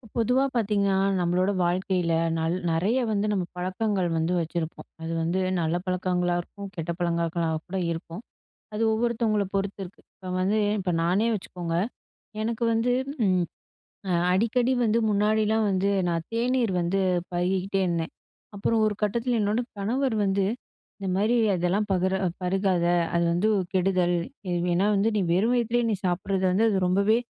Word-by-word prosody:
பொதுவா 250 +3 +2
பார்த்தீங்கன்னா, 200 -4 +1 0.2
நம்மளோட 180 +3 +1
வாழ்க்கையில 180 -1 0 0.2
நல் 165 +2 0 0.2
நெறைய 190 +10 +1
வந்து 205 0 0
நம்ம 195 -3 0
பழக்கங்கள் 185 0 -1
வந்து 160 +2 0
வச்சிருப்போம். 165 0 -4 0.2
அது 165 - -4
வந்து 170 +3 0 0.2
நல்ல 160 +1 0
பழக்கங்களா 180 -1 0
இருக்கும், 200 +3 -10
கெட்ட 165 -1 -3
பழக்கங்களா 170 -1 0 0.2
கூட 190 +1 -4
இருக்கும். 165 +3 -6 0.5
அது 215 +2 -1
ஒவ்வொருத்தவங்களை 220 -2 +1
பொறுத்து 195 0 -2
இருக்கு. 180 - -14
இப்ப 185 -1 -7
வந்து, 205 +4 +2 0.2
இப்ப 185 -2 -1
நானே 195 +7 +2
வச்சுக்கோங்க, 175 -3 -4 0.7
எனக்கு 230 +1 -2
வந்து 225 +2 +1 0.3
ம் 185 -2 +2 0.9
அடிக்கடி 235 +6 +2
வந்து 225 0 +2
முன்னாடிலாம் 215 +1 +2
வந்து 195 +1 +1 0.2
நான் 165 -1 -1
தேநீர் 240 -1 +1
வந்து 175 +3 0 0.3
பருகிகிட்டே 185 +2 0
இருந்தேன். 170 -2 -2 0.4
அப்பறம் 220 +2 +1
ஒரு 210 - 0
கட்டத்தில 235 +3 0
என்னோட 210 +3 +1 0.2
கணவர் 245 +5 0
வந்து, 195 0 +1 0.5
"இந்த 195 - -6
மாரி 215 +5 +2 0.2
அதெல்லாம் 180 +4 0
பகுர 190 +1 +1 0.2
பருகாத. 185 -1 +1 0.3
அது 170 0 +2
வந்து 180 +6 +1 0.3
கெடுதல். 180 -1 +2 0.3
ஏவ் 175 0 0
ஏன்னா 185 +4 +2
வந்து 205 +3 +2
நீ - - +2
வெறும் 215 +8 +2
வயித்திலேயே 240 0 +1
நீ 210 - +1
சாப்பிடுறது 185 +2 -1
வந்து 205 +5 +3
அது 205 - +1
ரொம்பவே 200 +4 +3
195 Hz, 145 wpm, -26 LUFS, 175-215 Hz, 0.9 s, வந்து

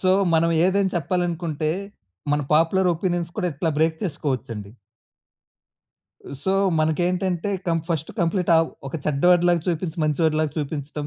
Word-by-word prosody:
So, 185 - +2 0.2
మనం 165 +1 +3
ఏదైనా 190 +1 +2
చెప్పాలనుకుంటే, 170 -2 -1 0.6
మన 150 - +2
పాపులర్ 180 +4 +3
ఒపీనియన్స్ 175 -1 -2
కూడా 185 -4 0
ఇట్లా 160 +3 -1
బ్రేక్ 160 0 +2
చేసుకోవచ్చండి. 130 - -3 1.7
సో, 190 - +1 0.3
మనకేంటంటే 175 +4 0 0.2
కం 165 -1 +2
ఫస్ట్ 160 -2 -2
కంప్లీటావ్ 170 -2 +3 0.2
ఒక 135 - -7
చెడ్డవాడిలాగా 175 +4 +3
చూపించి, 170 0 -2
మంచి 150 +2 0
వాడిలాగా 155 -1 +1
చూపించడం. 145 0 -4
165 Hz, 120 wpm, -23 LUFS, 155-180 Hz, 1.7 s, మనం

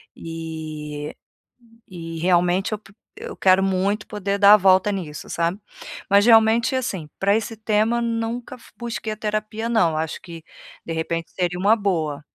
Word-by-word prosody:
E 155 -2 -6 0.7
e 165 -3 -8
realmente 180 +3 +2
eu 215 - -1
po 200 -2 -19 0.3
eu 465 +1 -7
quero 190 0 +4
muito 195 +2 0
poder 200 -1 -3
dar 200 0 +7
a - - +10
volta 190 +1 +4
nisso, 170 -7 -6
sabe? 170 +3 -1 0.5
Mas 200 +2 +5
realmente, 225 +2 +5
assim, 195 -12 -3
pra 200 +1 +2
esse 225 +1 -2
tema 220 +2 +1
nunca 235 +2 -3
fu - - -18
busquei 230 -2 -5
terapia 215 +1 -3
não, 175 -9 +2
acho 160 0 -3
que, 165 -3 -11 0.4
de 165 - -5
repente 165 +1 -3
seria 180 -1 -2
uma 205 +4 +4
boa. 160 -9 -2
195 Hz, 155 wpm, -22 LUFS, 165-220 Hz, 0.7 s, a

